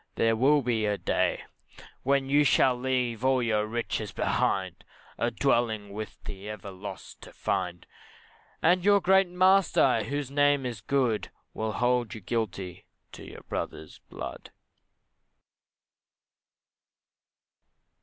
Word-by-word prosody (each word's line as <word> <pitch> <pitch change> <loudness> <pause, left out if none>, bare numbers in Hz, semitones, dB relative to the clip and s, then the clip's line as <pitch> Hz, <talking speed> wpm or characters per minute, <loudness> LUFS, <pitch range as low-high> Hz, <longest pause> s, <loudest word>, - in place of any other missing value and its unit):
there 115 0 +2
will 140 +5 +3
be 115 -3 0
a 105 -1 0
day, - - 0 0.6
When 135 0 +1
you 145 +2 +4
shall 130 -2 +4
leave 125 -2 -1
all 130 -1 +3
your 110 -2 +1
riches 110 -2 -3
behind, - - -1 0.4
A - - +1
dwelling 110 -4 0
with 110 +1 -7
the 100 +1 -8
ever 100 -2 -7
lost 95 0 -9
to - - -12
find, 90 -2 -3 0.8
And 175 +2 +4
your 200 +1 +5
great 190 0 +4
Master, 180 -8 +4
He 105 - -6
whose 145 -1 -3
name 145 -1 +3
is 120 -5 -5
good 120 -2 0 0.2
Will 110 0 -3
hold 120 -2 0
you 110 - -9
guilty 95 -4 -4 0.3
of - - -10
your - - -10
brother's 80 - -6
blood. - - -7
120 Hz, 125 wpm, -28 LUFS, 105-140 Hz, 0.8 s, your